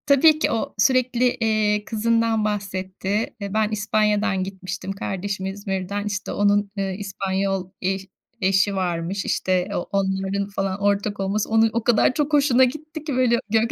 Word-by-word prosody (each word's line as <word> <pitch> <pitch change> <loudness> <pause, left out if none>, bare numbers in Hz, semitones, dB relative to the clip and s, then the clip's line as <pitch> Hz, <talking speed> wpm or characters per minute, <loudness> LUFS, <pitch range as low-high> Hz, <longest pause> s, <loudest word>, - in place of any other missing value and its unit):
tabii 310 +2 +5
ki - - +1
o 225 - -2
sürekli, 250 +2 +3
eee, 215 -3 +1
kızından 230 0 +1
bahsetti. 190 -2 -3 0.3
Eee, 200 -1 -4
ben 215 -1 +2
İspanya’dan 210 -2 +1
gitmiştim, 190 0 -6
kardeşim 195 0 -4
İzmir’den. 195 0 -3
İşte 205 -2 -3
onun, 205 0 +2
eee, 195 -1 -2
İspanyol 195 -1 -2
eş 190 +1 -2 0.3
eşi 195 +1 +2
varmış, 180 +1 -2
işte, 185 -1 0
o - - -3
onların 195 0 -1
falan 195 -1 -3
ortak 205 0 0
olması 195 +2 -1
onun 225 0 +4
o 230 -1 -1
kadar 240 +2 +3
çok 295 +2 -1
hoşuna 275 -3 +5
gitti 310 +4 -3
ki 295 -4 -3
böyle 245 -2 +3
gök 225 +2 +2
205 Hz, 155 wpm, -23 LUFS, 195-225 Hz, 0.3 s, tabii